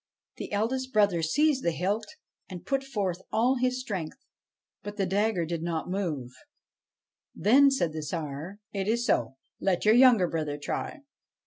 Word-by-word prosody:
' - - -50
The - - -6
eldest 255 +5 -1
brother 205 -6 +3
seized 270 - +2
the - - +2
hilt, 195 +6 -1 0.4
and 180 -3 -8
put 275 -1 0
forth 200 -9 -2
all 245 +4 +2
his 255 0 0
strength; 190 - -5 0.6
but 205 0 -8
the 195 - +1
dagger 195 -1 +1
did 165 0 -3
not 170 +1 -3
move. 155 -11 -3 1.0
Then 260 - +5
said 175 - 0
the 155 - -4
Tsar: 155 +3 -5
' 215 - -47
It 195 -1 -2
is 235 +2 +1
so. 120 - +1 0.2
Let 190 -1 0
your 215 - +6
younger 240 -7 +6
brother 155 -3 -3
try.' 150 - -4
200 Hz, 165 wpm, -28 LUFS, 165-240 Hz, 1.0 s, your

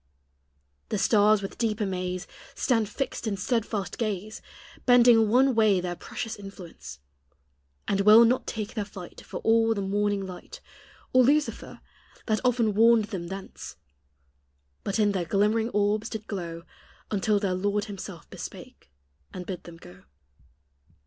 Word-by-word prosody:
The - - -1
stars 205 +1 +4
with 195 - -7
deep 225 -2 0
amaze 185 -3 -2 0.3
Stand 225 -5 +1
fixed 255 0 -4
in 200 -2 -1
steadfast 210 -1 -2
gaze, 215 -2 -3 0.5
Bending 240 -3 +6
one 260 +4 +4
way 215 -4 +4
their 175 0 -3
precious 225 +5 -6
influence; 170 - -10 0.9
And 200 0 +1
will 215 +3 +8
not 250 +3 +1
take 215 -2 -4
their 215 - -2
flight 195 -3 -10
For - - -7
all 225 0 +3
the 200 - -2
morning 205 0 0
light, 185 -1 -10 0.5
Or 255 0 +6
Lucifer 295 +4 0 0.4
that 215 -2 +1
often 235 -4 +2
warned 225 +1 +5
them 170 -3 -4
thence; 190 +1 -8 1.1
But 195 - -2
in 210 -2 +3
their 190 -3 -1
glimmering 210 +5 +1
orbs 210 +1 0
did 220 -2 -6
glow 170 -5 -5 0.5
Until 205 0 +1
their 195 -3 -1
Lord 205 +2 -1
himself 195 -4 -8
bespake, - - -10 0.4
and 180 -1 -7
bid 180 -1 -6
them 170 -1 -11
go. 95 - -15
205 Hz, 140 wpm, -27 LUFS, 190-225 Hz, 1.1 s, will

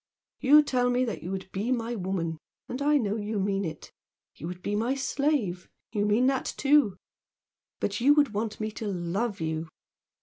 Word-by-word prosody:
You 295 +3 +7
tell 250 -3 +1
me 250 +1 +2 0.2
you 170 - -6
would 190 0 -5
be 210 +6 -2
my 235 -1 -1
woman, 180 -6 -2 0.3
and 255 +3 -5
I 295 +1 +4
know 215 -5 0
you 210 0 -2
mean 195 0 0
it. 160 -4 -6 0.4
You 160 - -7
would 180 +1 -7
be 205 - -1
my 235 +5 +1
slave 270 - -1 0.2
you 210 -2 0
mean 220 +5 +3
that, 265 0 0
too. 280 -8 +4 0.8
But 205 +3 -2
you 285 +4 +6
would 290 -6 +3
want 210 +1 -2
me 215 0 -2
to 215 0 -5
love 195 +4 -2
you! 160 0 -2
215 Hz, 180 wpm, -28 LUFS, 190-255 Hz, 0.8 s, You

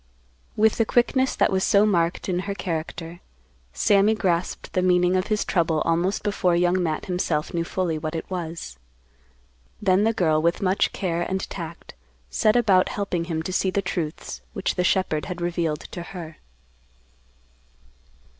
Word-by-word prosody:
With 220 0 +3
the - - +5
quickness 260 +3 +2
that - - +2
was 190 0 +1
so 200 +1 +4
marked 170 -4 +1
in 180 -2 0
her 200 - -2
character, 165 -1 -5 0.5
Sammy 205 - +3
grasped 180 -4 -1
the 185 - +2
meaning 180 0 +3
of 185 +1 0
his 215 -2 0
trouble 165 -3 +1
almost 170 +4 0
before 195 -4 +1
Young 180 +1 +2
Matt 160 -3 -2
himself 180 -3 -1
knew 170 -1 0
fully 170 -2 -2
what 155 +1 -4
it 165 - -4
was. 165 - -6 1.0
Then 195 0 +3
the 225 - +3
girl, 160 -8 +2
with 170 +2 +1
much 190 0 +1
care 175 -3 -2
and 190 +2 -2
tact, 170 -3 -7 0.4
set 215 +1 +3
about 200 -6 +4
helping 180 -4 -2
him 160 -2 -3
to 185 - -4
see 190 - +1
the 200 +1 -1
truths 165 -3 -4
which 195 - -1
the 180 - 0
shepherd 180 -5 +1
had 180 -2 -5
revealed 170 -3 -1
to 175 - -6
her. 170 -3 -8
180 Hz, 165 wpm, -24 LUFS, 165-195 Hz, 1.0 s, the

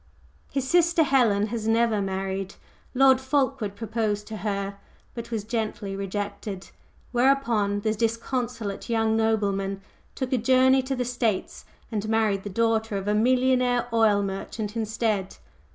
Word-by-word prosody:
His 270 -1 -2
sister 340 +1 +4
Helen 235 -8 +3
has 225 -2 -3
never 225 -2 +2
married. 195 0 -3 0.4
Lord 265 0 +5
Fulkeward 265 -6 0
proposed 215 -1 -2
to 220 - -5
her 200 -1 -3 0.3
but 235 -1 -7
was 225 -3 -3
gently 215 -3 -3
rejected, 200 0 -5 0.4
whereupon 240 -6 +2
the 215 0 0
disconsolate 230 -1 -2
young 225 -1 +2
nobleman 200 -3 0 0.4
took 260 -1 -3
a 255 - +2
journey 260 +3 +4
to 265 +1 -3
the 250 -1 -2
States 235 -5 -2 0.3
and 215 -1 -2
married 220 -3 +2
the 205 - -6
daughter 225 0 0
of 195 +1 -5
a 210 - +2
millionaire 250 +1 +2
oil 215 -3 +4
merchant 200 +2 -4
instead. 220 -3 -1
225 Hz, 135 wpm, -25 LUFS, 205-250 Hz, 0.4 s, Lord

